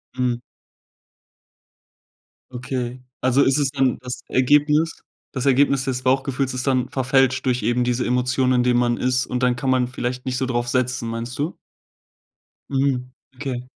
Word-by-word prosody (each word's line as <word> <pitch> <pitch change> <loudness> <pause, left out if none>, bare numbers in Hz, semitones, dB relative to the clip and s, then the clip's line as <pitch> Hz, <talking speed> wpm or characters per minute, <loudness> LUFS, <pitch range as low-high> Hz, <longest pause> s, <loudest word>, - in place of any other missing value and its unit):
Hm. 125 -1 +1 2.2
Okay. 125 0 -4 0.2
Also, 130 +2 +3
ist 135 +1 +3
es 145 -2 +2
dann 135 -3 +1
das 125 -1 -6
Ergebnis 150 +5 +2 0.3
das 130 +1 -1
Ergebnis 140 0 +3
des 130 -1 -2
Bauchgefühls 130 0 0
ist 125 +1 -3
dann 130 -2 +1
verfälscht 130 0 +2
durch 125 -3 +1
eben 120 +2 +1
diese 125 0 0
Emotionen, 125 +1 +1
in 125 -1 +3
denen 125 -1 +3
man 120 -1 +1
ist 125 0 +1
und 125 0 -3
dann 125 -1 +2
kann 130 +2 -1
man 125 -1 +2
vielleicht 125 0 -4
nicht 125 -1 -1
so 130 - 0
drauf 120 -1 -1
setzen, 125 -1 -1
meinst 115 +3 -5
du? 155 +5 -2 1.1
Mhm, 135 -2 0 0.2
okay. 130 -2 -4
125 Hz, 155 wpm, -22 LUFS, 125-135 Hz, 2.2 s, Also